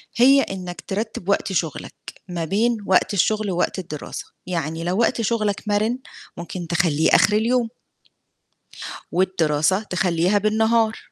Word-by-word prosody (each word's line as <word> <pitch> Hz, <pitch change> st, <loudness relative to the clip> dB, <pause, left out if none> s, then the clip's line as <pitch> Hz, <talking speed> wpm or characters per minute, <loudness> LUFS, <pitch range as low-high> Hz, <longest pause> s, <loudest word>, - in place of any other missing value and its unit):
هي 270 Hz, +3 st, +6 dB
إنّك 180 Hz, -7 st, -5 dB
ترتّب 200 Hz, -1 st, -4 dB
وقت 200 Hz, -1 st, +1 dB
شُغلك 165 Hz, -4 st, -2 dB, 0.3 s
ما 170 Hz, -3 st, -3 dB
بين 225 Hz, +7 st, +1 dB
وقت 190 Hz, +2 st, +3 dB
الشُغل 210 Hz, +1 st, +1 dB
ووقت 180 Hz, +2 st, -1 dB
الدراسة، 155 Hz, -5 st, -6 dB, 0.2 s
يعني 165 Hz, -2 st, -3 dB
لو 175 Hz, +2 st, -1 dB
وقت 235 Hz, 0 st, +2 dB
شُغلك 215 Hz, -2 st, 0 dB
مَرِن 215 Hz, +4 st, +1 dB, 0.4 s
ممكن 170 Hz, 0 st, -6 dB
تخلّيه 160 Hz, -2 st, +2 dB
آخِر 210 Hz, -, +5 dB
اليوم 230 Hz, +2 st, +2 dB, 1.4 s
والدراسة 175 Hz, -1 st, +2 dB, 0.5 s
تخلّيها 205 Hz, -, +4 dB
بالنهار. 220 Hz, +2 st, +2 dB
195 Hz, 125 wpm, -22 LUFS, 175-220 Hz, 1.4 s, هي